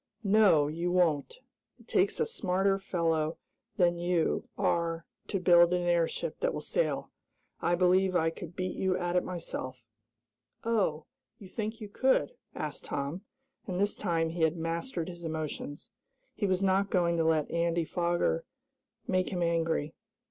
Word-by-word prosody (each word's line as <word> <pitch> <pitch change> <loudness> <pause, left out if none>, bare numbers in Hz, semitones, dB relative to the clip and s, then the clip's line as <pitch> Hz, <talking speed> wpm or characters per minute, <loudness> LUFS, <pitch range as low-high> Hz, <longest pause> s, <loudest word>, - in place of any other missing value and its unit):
"No, 195 -8 +5
you 170 +4 -2
won't! 175 - +1 0.4
It - - -19
takes - - +2
a 460 - +3
smarter 195 - +1
fellow 165 -4 0 0.4
than 175 -1 +3
you 175 -1 0
are 165 -1 0 0.2
to 195 - -1
build 175 -1 +6
an 180 - 0
airship 175 - 0
that - - 0
will - - -2
sail. - - -1 0.5
I 175 - +2
believe 185 +1 +3
I 165 -1 +3
could 175 -1 -9
beat 185 -1 -3
you 190 -1 +1
at 175 0 -2
it 180 - +3
myself." 130 -8 -5 0.8
"Oh, 195 -9 0 0.3
you 205 -6 -11
think 220 +3 -4
you 210 - -5
could?" 260 - +2 0.2
asked - - -5
Tom, 145 +6 -3 0.5
and 185 -2 -2
this 205 +1 +1
time 165 -4 0
he 170 0 -4
had 160 +1 +3
mastered 165 +2 -3
his 175 -1 -8
emotions. 155 -2 -5 0.5
He 205 - -1
was 190 0 +1
not 195 +1 +2
going 170 -2 +2
to 165 - +2
let 160 -2 +1
Andy 170 0 +1
Foger 170 -1 0 0.6
make 185 -1 +1
him 175 -2 -1
angry. 165 -2 0
175 Hz, 155 wpm, -30 LUFS, 165-190 Hz, 0.8 s, build